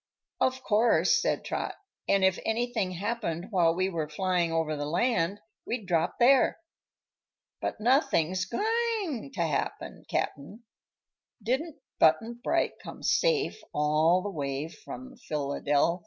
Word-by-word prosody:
"Of 260 0 +1
course," 225 +1 +3
said - - -1
Trot; - - -3 0.3
"and 195 -1 +3
if 190 -1 +2
anything 225 -4 -1
happened 195 -2 -3
while 170 -4 +3
we 185 +1 +1
were 165 -5 -3
flyin' 180 +1 0
over 160 -1 0
the 145 0 -3
land 195 +2 +1 0.2
we'd 230 -4 -4
drop 170 -3 0
there. 255 +2 +5 1.0
But - - -3
nothing's 215 - +2
goin' 435 - -1
to 185 - -4
happen, 150 -4 -3
Cap'n. 200 - -3 0.8
Didn't 275 +8 -1 0.2
Button 230 +9 +3
Bright - - 0
come - - -10
safe 450 -3 +1
all 155 +4 +3
the 205 - -3
way 140 -2 -3
from 260 +8 -10
Philydelfy?" 145 - 0
190 Hz, 125 wpm, -28 LUFS, 165-245 Hz, 1.0 s, there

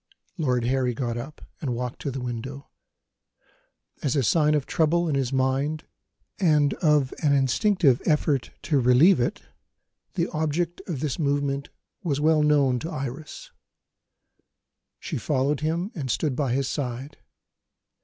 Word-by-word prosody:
Lord 125 -8 0
Harry 125 0 0
got 120 -2 -2
up, 135 +6 -7 0.2
and 125 -5 -2
walked 125 +1 -4
to - - -2
the 135 -1 -4
window. 130 +3 -6 1.3
As 140 - 0
a 140 - +2
sign 150 +3 +3
of 145 -3 0
trouble 170 +2 +1
in 155 - 0
his 135 -2 0
mind, 135 +4 0 0.6
and 150 -6 +3
of 150 -5 +3
an 145 -2 +3
instinctive 140 - +3
effort 150 -3 +1
to 140 0 +2
relieve 130 +9 +5
it, 120 - -1 0.7
the - - +1
object 160 +3 -1
of 155 -8 -3
this 150 -2 -2
movement 140 -1 0 0.3
was 150 -8 -1
well 155 +1 +3
known 140 -4 +3
to 160 - -5
Iris. 145 -1 -6 1.5
She - - -4
followed 140 0 0
him 170 +6 -1
and 140 -6 -5
stood 140 +2 0
by 135 -3 0
his 135 0 0
side. 135 +1 -4
140 Hz, 145 wpm, -25 LUFS, 130-155 Hz, 1.5 s, relieve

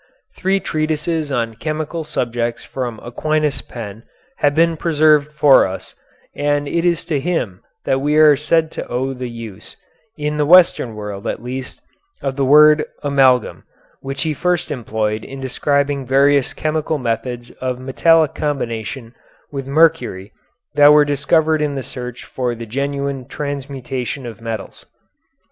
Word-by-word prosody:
Three 195 +1 +1
treatises 155 -1 -2
on 115 -3 -1
chemical 155 +1 -3
subjects 120 -4 -2
from 120 -4 -5
Aquinas' 150 +2 -1
pen 110 -3 -8 0.4
have 145 0 +2
been 165 +1 +3
preserved 155 -2 +3
for 150 -6 +5
us, 95 - -7 0.4
and 145 0 0
it 170 +3 0
is 170 -2 +1
to 150 -4 -1
him 135 - -2 0.2
that 135 0 +1
we 150 +2 +1
are 155 -1 +7
said 155 +2 +1
to - - -6
owe 130 +2 -2
the 125 -1 -5
use, 115 -4 -9 0.4
in 150 0 -2
the 150 - +2
Western 170 -9 +5
world 105 0 -6
at - - -4
least, 130 +1 -6 0.4
of 135 -1 -3
the 140 - 0
word 150 +3 +6 0.2
amalgam, 135 -4 +2 0.4
which 135 0 -4
he 160 -1 -1
first 180 +3 -1
employed 110 -4 -2
in 135 - -9
describing 140 +1 -1
various 140 +1 +3
chemical 155 0 -1
methods 120 0 -3
of 130 -1 -2
metallic 155 +4 +3
combination 120 -4 -4 0.4
with 135 -2 -5
mercury 150 - +2 0.4
that 145 0 +7
were 150 -1 +6
discovered 155 +2 +2
in 145 -2 -1
the 135 - -3
search 125 -1 -7
for 125 -2 -3
the 115 0 -7
genuine 140 +2 -3
transmutation 135 -2 -5
of 115 -2 -8
metals. 115 -3 -6
140 Hz, 145 wpm, -19 LUFS, 125-150 Hz, 0.4 s, are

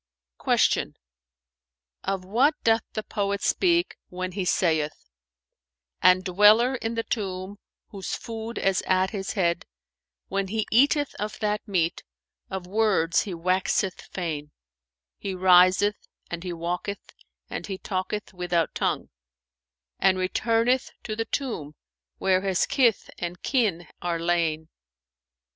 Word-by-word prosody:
Q - - +2 1.1
"Of 190 -1 -2
what 255 +10 +3
doth 225 0 +4
the 215 - -3
poet 200 -2 -2
speak, 345 -1 +2
when 185 +1 -4
he 190 0 -3
saith, 155 - 0 0.9
'And 185 +1 +6
dweller 210 +7 +5
in 230 -2 -3
the 230 - -1
tomb 195 -3 -4 0.3
whose 195 -2 -4
food 225 0 -6
is 195 -1 +1
at 185 0 +2
his 195 -2 -3
head, 170 -4 0 0.3
* - - -64
When 195 0 -1
he 220 +2 -1
eateth 285 +4 +4
of 210 +1 -3
that 210 +1 -1
meat, 175 -4 0 0.5
of 190 -1 -4
words 195 -4 +2
he 180 - -4
waxeth 185 +2 0
fain: 155 -5 -4 0.7
He 195 -2 -4
riseth 185 +3 +4 0.2
and 170 0 -4
he 180 - -4
walketh 175 +4 -4 0.3
and - - -5
he 195 -2 -4
talketh 190 +3 -4
without 175 -2 0
tongue; - - -1 0.5
* 65 0 -63
And 190 -1 +4
returneth 230 +7 +1
to 215 - -4
the 225 +1 -2
tomb 170 - -3 0.4
where 185 -1 +2
his 190 -2 +1
kith 235 -6 +2
and 175 0 -5
kin 210 -10 +1
are 175 -1 -1
lain. 165 -2 0
190 Hz, 130 wpm, -26 LUFS, 175-215 Hz, 1.1 s, And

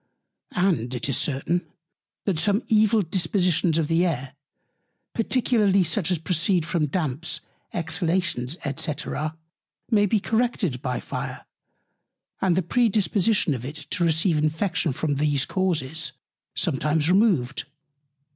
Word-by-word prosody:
And 165 -10 +1
it 125 - -2
is 135 - +2
certain, 160 +5 -1 0.6
that 185 -6 +1
some 205 +6 +1
evil 215 0 +4
Dispositions 180 -2 +1
of 160 -2 +1
the 165 +2 +2
Air, 135 -7 -2 0.8
particularly 220 -5 +2
such 170 +1 0
as 180 - +2
proceed 170 +1 +1
from 165 -3 0
Damps, 155 0 -2 0.3
Exhalations, 165 -4 -1 0.2
&c. 160 -1 0 1.0
may 205 -2 +4
be 215 +2 +2
corrected 220 - 0
by 125 -2 -2
Fire, - - -5 1.0
and 185 -3 +3
the 185 - +1
Predisposition 210 -3 +2
of 125 -3 -5
it 140 +4 -6 0.2
to 175 - +1
receive 165 0 +2
Infection 160 +2 0
from 145 +2 -1
these 145 -2 +1
Causes 160 -6 -1 0.4
sometimes 150 0 +1
removed. 180 - +2
170 Hz, 120 wpm, -25 LUFS, 150-195 Hz, 1.0 s, evil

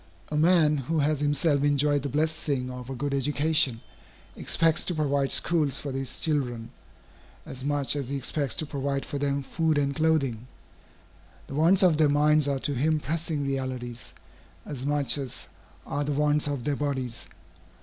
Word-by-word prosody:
A 150 - -4
man 155 -1 +4
who 145 +5 -2
has 150 0 +1
himself 145 0 +1
enjoyed 145 0 +2
the 140 - -4
blessing 145 -3 -1
of 125 0 -8
a 135 - -4
good 140 +2 -3
education, 145 -3 +2 0.5
expects 165 -1 +2
to 180 - -2
provide 140 -3 0
schools 155 -5 +3
for 140 - -5
his 135 -1 -4
children, 125 -7 -2 0.7
as 130 0 -8
much 145 0 +1
as 140 -3 -4
he 140 - -2
expects 135 -1 -1
to 155 - -2
provide 140 -1 -3
for 145 - -5
them 140 0 -1
food 160 +2 0
and 140 -1 0
clothing. 140 -7 0 1.0
The - - -10
wants 170 +7 +4
of 170 -5 +4
their 155 -2 +4
minds 150 0 +3
are 140 -1 0
to 145 - -1
him 155 +4 +1
pressing 155 -1 -3
realities, 130 -3 -5 0.5
as 135 -2 -5
much 145 -2 +2
as 135 -3 -6 0.4
are 145 +1 -2
the 145 0 -2
wants 150 +1 +2
of 140 -4 -3
their 145 +2 -1
bodies. 130 -5 -3
145 Hz, 170 wpm, -26 LUFS, 135-150 Hz, 1.0 s, man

